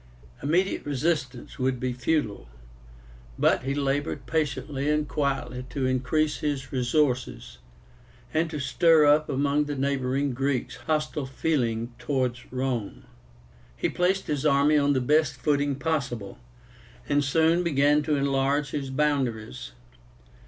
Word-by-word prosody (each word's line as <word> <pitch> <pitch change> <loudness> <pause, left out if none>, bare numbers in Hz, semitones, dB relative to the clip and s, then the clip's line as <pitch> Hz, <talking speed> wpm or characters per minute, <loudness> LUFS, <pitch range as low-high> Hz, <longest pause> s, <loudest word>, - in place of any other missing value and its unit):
Immediate 175 +7 +1
resistance 140 -4 -2
would 130 -1 0
be 125 0 -2
futile; 125 - -1 0.9
but - - +3
he 135 +2 -2
labored 140 -1 -1
patiently 140 0 -1
and 150 0 +1
quietly 130 -3 -2
to 130 +1 -2
increase 130 +4 +1
his 140 -3 -3
resources, 125 - -1 0.7
and 160 +1 +1
to 155 - -5
stir 155 +3 +4
up 150 +1 +4
among 140 +2 +1
the 145 0 -4
neighboring 135 0 0
Greeks 135 0 -2
hostile 150 -3 -2
feeling 120 -5 -1
towards 125 -1 -2
Rome. 125 - -3 0.7
He - - 0
placed 185 +2 0
his 150 -2 -2
army 145 0 +4
on 145 -1 +3
the 130 - +1
best 150 +1 +2
footing 145 +1 0
possible, 130 -9 -3 0.7
and 145 0 +2
soon 160 +4 +3
began 150 -3 +3
to 150 0 0
enlarge 140 +1 +1
his 140 -2 -3
boundaries. 130 - -1
140 Hz, 125 wpm, -26 LUFS, 130-150 Hz, 0.9 s, stir